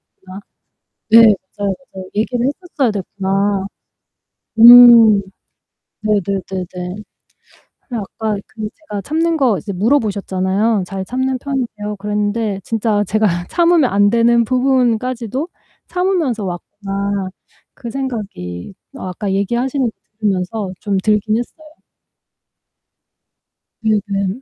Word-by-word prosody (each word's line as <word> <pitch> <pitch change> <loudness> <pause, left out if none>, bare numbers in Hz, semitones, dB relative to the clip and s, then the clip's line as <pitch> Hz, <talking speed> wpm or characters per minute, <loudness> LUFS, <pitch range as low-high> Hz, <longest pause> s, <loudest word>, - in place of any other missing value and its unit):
됐구나.' 190 +1 -11 0.7
네. 230 - +8 0.4
맞아요, 200 -1 -1 0.2
맞아요. 190 -1 -7
'얘기를 240 +3 0
했었어야 285 -4 -1
됐구나.' 195 0 -1 0.9
음. 235 -3 +9 0.8
네네네네. 195 -3 -1 1.2
근데 230 -4 -3 0.2
아까 215 -2 -1
그 220 - -10
제가 210 -11 -7
참는 325 - 0
거 240 -9 +2
이제 200 +4 -6
물어보셨잖아요. 200 -2 0
"잘 190 -1 -4
참는 260 +3 -2
편이세요?" 235 -7 -4
그랬는데 210 0 -2
진짜 215 -2 0
제가 215 +2 +1 0.2
'참으면 340 -6 +3
안되는 230 +4 +3
부분까지도 255 - 0 0.4
참으면서 345 - -1
왔구나.' 195 +2 -4 0.5
그 235 -3 -8
생각이 205 - -5 0.2
아까 190 -2 -4
얘기하시는 240 +7 0
거 - - -7 0.3
들으면서 195 0 -2
좀 200 -2 -1
들긴 215 +2 +1
했어요. 310 +6 -7 2.2
네 215 -1 +2
네. 200 -1 -1
215 Hz, 250 characters per minute, -17 LUFS, 200-245 Hz, 2.2 s, 음